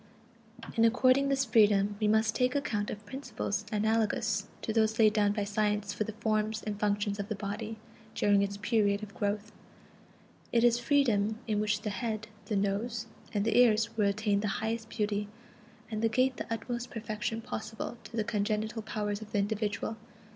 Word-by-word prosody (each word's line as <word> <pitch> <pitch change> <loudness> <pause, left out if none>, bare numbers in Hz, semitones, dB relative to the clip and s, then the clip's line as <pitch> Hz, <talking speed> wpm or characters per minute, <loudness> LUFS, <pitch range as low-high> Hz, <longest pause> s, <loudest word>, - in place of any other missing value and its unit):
In 225 - +3
according 255 +4 +4
this 270 -1 +2
freedom 205 -3 +4
we 215 - +3
must 220 +1 +3
take 250 +2 +1
account 225 -8 -1
of 210 0 -6
principles 215 -4 -4
analogous 215 -2 +1 0.2
to 220 - -1
those 220 0 +2
laid 215 -2 +5
down 205 -2 +3
by 205 0 -1
science 205 0 0
for 215 - -1
the 220 - -5
forms 215 0 -1
and 210 -1 -4
functions 205 0 0
of 200 - -4
the 215 - -1
body 210 +3 -4 0.4
during 205 -1 +4
its 200 0 -1
period 205 -1 +1
of 205 -1 -8
growth; 205 +1 -2 1.0
it 235 -1 +3
is 240 0 +5
a - - -8
freedom 230 -6 +2
in 215 -2 0
which 210 0 0
the 210 - -2
head, 215 +2 -3 0.2
the 215 - -2
nose, 205 +4 -1 0.3
and 205 -1 0
the 225 - +1
ears 230 -2 +4
will 210 -2 +3
attain 205 0 +1
the 210 - -1 0.2
highest 225 0 -2
beauty, 210 -2 -1 0.6
and 215 -1 -2
the 225 - +3
gait 255 +3 +2
the - - -6
utmost 240 +2 -3
perfection 220 0 -3
possible 220 0 -5
to 230 - -8
the 220 - +2
congenital 215 +1 -1
powers 210 -1 -3
of 215 - -10
the - - +1
individual. 210 +1 -1
215 Hz, 185 wpm, -30 LUFS, 205-225 Hz, 1.0 s, laid